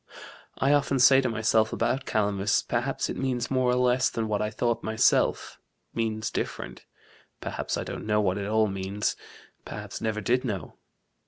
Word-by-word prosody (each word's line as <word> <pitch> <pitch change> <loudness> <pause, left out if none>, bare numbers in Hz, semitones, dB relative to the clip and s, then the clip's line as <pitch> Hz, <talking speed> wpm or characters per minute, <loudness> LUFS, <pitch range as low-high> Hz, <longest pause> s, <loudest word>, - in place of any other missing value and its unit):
I 140 +2 +3
often 140 -1 +2
say 135 +1 +7
to 130 - 0
myself 110 -1 +2
about 125 +4 -1
Calamus 100 -1 +1
perhaps - - -1
it - - -4
means 125 -2 -2
more 130 -1 +2
or 125 - +3
less 125 0 +3
than 115 -1 -2
what 105 -1 -1
I 105 - 0
thought 115 +2 -1
myself 110 0 +1 0.3
means 110 -1 -2
different: - - -5 0.5
perhaps - - -3
I - - -2
don't - - -6
know 105 0 +2
what 100 -1 +1
it 100 - -3
all 110 +1 +3
means 95 +1 -2 0.5
perhaps - - -7
never 110 -1 -1
did 125 +5 +1
know. 100 - -5
110 Hz, 170 wpm, -27 LUFS, 105-125 Hz, 0.5 s, say